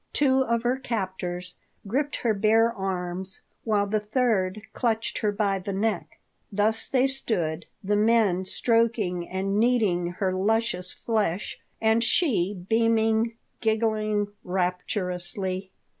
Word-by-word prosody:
Two 265 -2 +3
of 235 -2 0
her 245 +2 +1
captors 185 -7 -4 0.3
gripped 280 +8 -1
her 230 -2 +1
bare 220 +3 +3
arms, 190 -2 -2 0.2
while 210 -3 +2
the 215 +1 0
third 210 -3 0
clutched 225 -2 -1
her 210 - +1
by 200 -2 0
the 195 +2 -4
neck. 205 -1 -2 0.3
Thus 215 +2 +1
they 260 -1 +3
stood, 175 -12 -1 0.2
the 205 +2 +1
men 210 -4 +3
stroking 215 -5 +1
and 195 +2 -1
kneading 205 -8 +2
her 185 0 -1
luscious 195 -1 0
flesh, 210 -5 -2 0.2
and 225 +1 +3
she 200 - +1
beaming 225 0 +3
and 225 +1 0 0.3
giggling 215 -2 +1
rapturously. 185 +1 -2
210 Hz, 125 wpm, -26 LUFS, 185-230 Hz, 0.3 s, Two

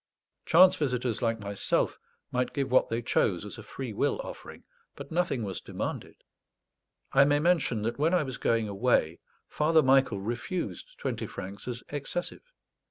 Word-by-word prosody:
Chance 185 +3 +7
visitors 125 -5 -1
like 115 -1 0
myself 100 -1 -1 0.3
might 125 0 -1
give 135 -3 -2
what 130 - +4
they 115 +1 -2
chose 95 -4 +1
as 105 - -7
a - - -7
free 120 +1 -6
will - - 0
offering, - - -10 0.3
but - - -10
nothing 165 -8 0
was 95 -3 -4
demanded. - - -6 0.9
I 135 - +7
may 145 +1 +3
mention 145 -9 +1
that 115 +4 -2
when 160 +5 +3
I 175 - +3
was 130 -3 -5
going 115 -2 +1
away 100 -6 +1 0.3
Father 155 +1 +3
Michael 130 -5 +4
refused 125 - -4
twenty 115 -3 -3
francs 100 +3 -8
as 120 -1 -5
excessive. 175 - -5
125 Hz, 160 wpm, -29 LUFS, 110-150 Hz, 0.9 s, Chance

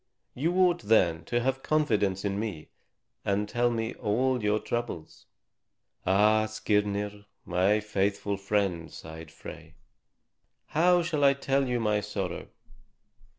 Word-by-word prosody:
You 165 +7 -1
ought, 180 -2 +3
then, 90 -7 +3
to 120 0 0
have 135 +2 -1
confidence 105 -12 +1
in 100 0 -1
me 100 -8 -5 0.5
and 100 +1 0
tell 120 +2 +1
me 115 -1 -2
all 125 +3 0
your 105 0 +2
troubles." 120 -7 -5 0.8
"Ah, 105 +3 +4
Skirnir, 105 -1 -1 0.2
my 95 +4 +2
faithful 100 -1 -1
friend," 100 -4 -1
sighed 80 0 -9
Frey, 80 - -11 0.9
"how 175 +2 +4
shall 155 -4 -1
I 140 0 +7
tell 135 0 0
you 125 -1 0
my 105 -2 +1
sorrow? 100 -3 -4
105 Hz, 125 wpm, -28 LUFS, 100-125 Hz, 0.9 s, I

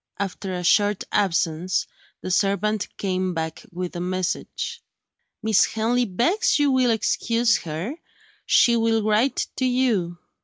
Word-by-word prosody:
After 195 -1 -4
a 180 - -4
short 205 +3 +3
absence, 180 -2 0 0.4
the 185 - -4
servant 200 +2 +1
came 185 -2 -1
back 160 0 -4
with 180 0 -5
a - - -3
message. 185 - -3 0.6
"Miss 220 -3 +4
Henley 235 +3 0
begs 255 - +1
you 290 -1 +2
will 255 -2 +3
excuse 230 +1 +1
her. 170 - -5 0.5
She 235 - +5
will 225 -1 +1
write 215 +5 +1
to 260 - 0
you." 235 -9 +1
205 Hz, 130 wpm, -23 LUFS, 180-235 Hz, 0.6 s, She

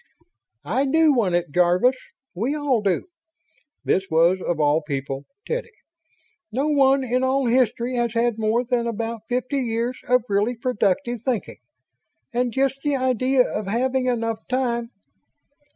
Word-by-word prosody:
"I 245 - +1
do 315 +2 +4
want 205 -9 +1
it, 175 -3 -1
Jarvis. 180 - +3 0.4
We 235 +11 -1
all 285 -6 +1
do." 195 -3 0 0.8
This 190 +1 0
was, 170 +3 +3
of 170 -3 -1
all 150 +1 +3
people, 140 -2 -4 0.2
Teddy! 485 +1 -3 0.8
"No 275 +6 0
one 275 -2 +4
in 255 +1 0
all 265 +1 +1
history 245 0 +1
has 235 -1 -1
had 230 -1 +1
more 220 +3 +1
than 240 -1 -1
about 230 0 -4
fifty 255 +3 -1
years 235 0 -2
of 250 -1 +3
really 205 +4 +1
productive 235 0 -1
thinking. 245 -6 -2 0.7
And 245 0 0
just 270 +2 0
the 290 0 0
idea 255 0 +2
of 210 -2 -4
having 255 +4 0
enough 230 -2 -2
time 240 -2 -1
240 Hz, 145 wpm, -23 LUFS, 210-260 Hz, 0.8 s, do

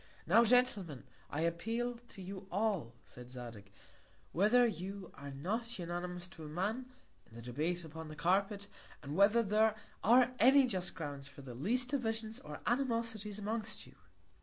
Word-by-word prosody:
Now, 220 +8 +6
Gentlemen, 215 - +2 0.3
I 150 - -2
appeal 230 +9 -1
to 190 - -10
you 190 +1 -7
all, 190 - 0
said 125 0 -11
Zadig, 120 -5 -9 0.6
whether 215 +7 +5
you 195 -2 -4
are 140 0 -8
not 220 - -3
unanimous 175 0 -4
to 165 -3 -11
a - - -6
Man, 205 +11 -2 0.4
in 115 - -16
the 115 - -8
Debate 155 +9 -1
upon 160 0 -8
the 155 - -8
Carpet, 195 +5 +1 0.4
and 145 +1 -4
whether 205 +5 +5
there 215 +1 +3 0.3
are 245 +3 +6
any 270 +2 +7
just 185 -7 -1
Grounds 145 -4 -5
for 140 - -12
the 130 -2 -7
least 240 - 0
Divisions 225 -5 -1
or 150 -1 -8
Animosities 230 -5 0
amongst 215 0 -3
you. - - -16
195 Hz, 160 wpm, -35 LUFS, 160-225 Hz, 0.6 s, any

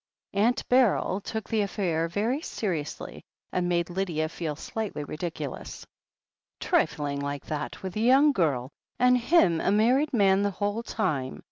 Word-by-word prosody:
Aunt 225 +6 +1
Beryl 235 -6 +3
took 220 +2 -5
the 220 -1 +1
affair 180 -5 -1
very 220 - -1
seriously, 170 - -4 0.3
and 180 -1 0
made 170 0 0
Lydia 170 -4 -1
feel 160 -2 -4
slightly 210 -2 -4
ridiculous. 155 -1 -6 0.7
"Trifling 145 -1 0
like 140 0 -4
that 150 +3 -5
with 190 -1 -5
a - - -1
young 265 +6 +5
girl, 140 - 0 0.3
and 250 0 +5
him 240 - +3
a - - +1
mar 225 +5 +4
ried 300 +2 0
man 200 -5 +4
the 205 - +2
whole 205 +2 -2
of 235 - -8
the - - -6
time 145 - -1
195 Hz, 160 wpm, -27 LUFS, 155-225 Hz, 0.7 s, young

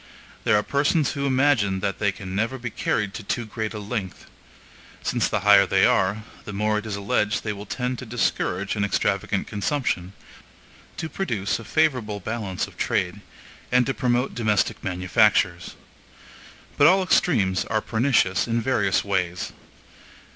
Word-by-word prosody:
There - - +4
are 105 - +1
persons 145 +3 +1
who 140 -1 -2
imagine 130 -8 +2
that 100 -3 -2
they 100 -1 +2
can 95 -1 -8
never 115 +6 -1
be 120 -2 -5
carried 105 -1 -1
to - - -6
too 115 +4 -2
great 110 0 -4
a - - -3
length; 105 -2 -5 0.8
since - - +1
the - - -1
higher 100 -1 +6
they - - +4
are, 100 +3 +2 0.2
the 105 - -7
more 105 +1 +1
it 110 - -8
is 105 - -3
alleged 105 +1 0
they 105 - -2
will 100 0 -9
tend 125 +2 -3
to 125 - -8
discourage 100 -4 -1
an 105 - 0
extravagant 100 - 0
consumption, 100 -5 -2 0.8
to 160 - -3
produce 110 - -2
a - - -8
favorable 120 -5 0
balance 100 -2 -3
of - - -16
trade, - - -1 0.5
and 125 0 +4
to 135 - -1
promote 125 +1 0
domestic 110 -4 0
manufactures. 90 -2 +1 1.0
But 145 - +8
all 190 +2 +5
extremes 100 - +2
are 110 - 0
pernicious 110 -4 +1
in 115 0 0
various 110 -5 +1
ways. 90 -3 -2
105 Hz, 160 wpm, -24 LUFS, 100-125 Hz, 1.0 s, But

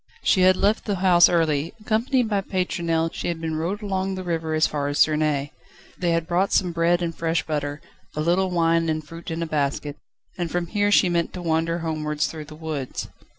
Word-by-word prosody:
She 185 - +3
had 185 0 +5
left 210 +2 +1
the 205 - 0
house 180 -2 +5
early: 165 0 +1
accompanied 230 +3 +1
by 205 -2 0
Pétronelle, 170 -4 -1
she - - -4
had 170 -2 -2
been 160 -1 -3
rowed 180 +7 -3
along 190 -1 -1
the 185 - -5
river 165 -2 -2
as 155 - +4
far 145 -1 -2
as 145 0 -2
Suresnes. 150 -2 +2 0.4
They 175 - -1
had 165 -1 +1
brought 180 +3 +1
some 180 -2 +2
bread 170 +1 +2
and 165 -1 -2
fresh 165 -1 -1
butter, 145 -1 -3 0.3
a 155 - -1
little 180 +4 +2
wine 165 -1 +2
and 155 -1 -2
fruit 165 +3 -9
in 165 +1 -2
a - - -2
basket, 145 -1 -2 0.4
and 175 -1 -1
from 175 +1 -1
here 205 +3 0
she 200 - +5
meant 170 -1 0
to 180 - -6
wander 165 0 0
homewards 150 -1 -1
through 155 -2 -6
the 155 +1 -11
woods. 155 -4 -5
165 Hz, 210 wpm, -24 LUFS, 155-185 Hz, 0.4 s, had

